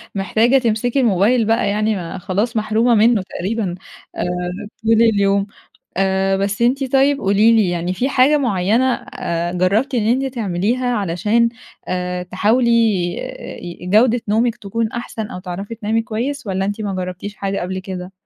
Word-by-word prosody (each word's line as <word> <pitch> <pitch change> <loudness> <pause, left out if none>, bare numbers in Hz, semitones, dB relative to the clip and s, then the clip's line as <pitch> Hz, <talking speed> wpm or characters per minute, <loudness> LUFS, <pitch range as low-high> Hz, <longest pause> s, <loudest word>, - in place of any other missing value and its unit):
محتاجة 220 +6 +2
تمسكي 240 +1 0
الموبايل 225 0 +3
بقى 225 -1 +1
يعني 215 +1 0
ما 175 -1 -5
خلاص 205 +6 -2
محرومة 220 +3 +2
منّه 225 0 +4
تقريبًا 195 -1 -3 0.4
آآ - - -2 0.6
طول 225 0 +3
اليوم. 200 -3 +3 0.5
آآ 190 0 +1
بس 200 +3 -1
أنتِ 260 +2 +1
طيب 275 +1 +4
قولي 205 +2 +4
لي، 220 -4 +3
يعني 175 +1 -2
في 250 +8 0
حاجة 275 +2 +4
معيّنة 235 +1 +1
أ 170 -4 -4
جرّبتِ 200 +10 +1
إن 225 -4 +1
أنتِ 260 +3 0
تعمليها 220 +3 -1
علشان 215 +1 +1 0.4
آآ 180 0 -2
تحاولي 225 +7 +1 0.9
ي 175 0 -8
جودة 225 +5 +4
نومِك 230 +3 +1
تكون 225 0 -3
أحسن 235 -2 -5
أو - - -7
تعرفي 195 +4 -6
تنامي 225 0 -1
كويس، 245 +6 -4
والّا 190 -1 -1
أنتِ 205 +2 -3
ما 205 -2 -3
جرّبتيش 185 +2 -5
حاجة 195 0 -2
قبل 185 +1 -3
كده؟ 185 -1 -7
215 Hz, 155 wpm, -19 LUFS, 190-235 Hz, 0.9 s, منّه